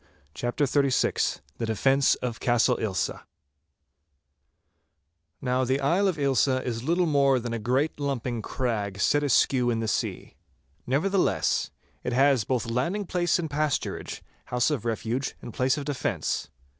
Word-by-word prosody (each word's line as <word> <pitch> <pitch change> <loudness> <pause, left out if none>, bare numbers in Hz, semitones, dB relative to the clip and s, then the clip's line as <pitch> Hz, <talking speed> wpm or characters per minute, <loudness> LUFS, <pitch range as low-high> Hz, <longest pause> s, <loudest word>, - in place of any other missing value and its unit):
*CHAPTER 120 - -1
XXXVI* 140 -1 +1 0.2
*THE 115 - -2
DEFENCE 135 +5 +3
OF 120 -2 -3
CASTLE 120 +1 +2
AILSA* 100 -4 -2 2.2
Now 125 0 +1
the 130 +2 +1
Isle 170 +9 +2
of 185 -4 0
Ailsa 135 -2 +2
is 115 -2 -3
little 170 +7 +1
more 140 -4 +3
than 120 0 -4
a 115 - -2
great 130 +8 0
lumping 125 -5 -2
crag 105 -6 -2
set 145 +8 +3
askew 130 -2 +3
in 115 -2 0
the 115 - -2
sea. - - -3 0.5
Nevertheless, 180 +9 +1 0.3
it 125 - -2
has 135 -3 +4
both 125 -1 0
landing 135 - -1
place 175 -1 +1
and 170 -2 -2
pasturage, 150 0 -2 0.2
house 125 +4 +1
of 125 -7 -2
refuge 115 +3 -2
and 120 - -9
place 130 +3 +1
of 145 - -4
defence. 135 - -2
130 Hz, 145 wpm, -26 LUFS, 120-145 Hz, 2.2 s, has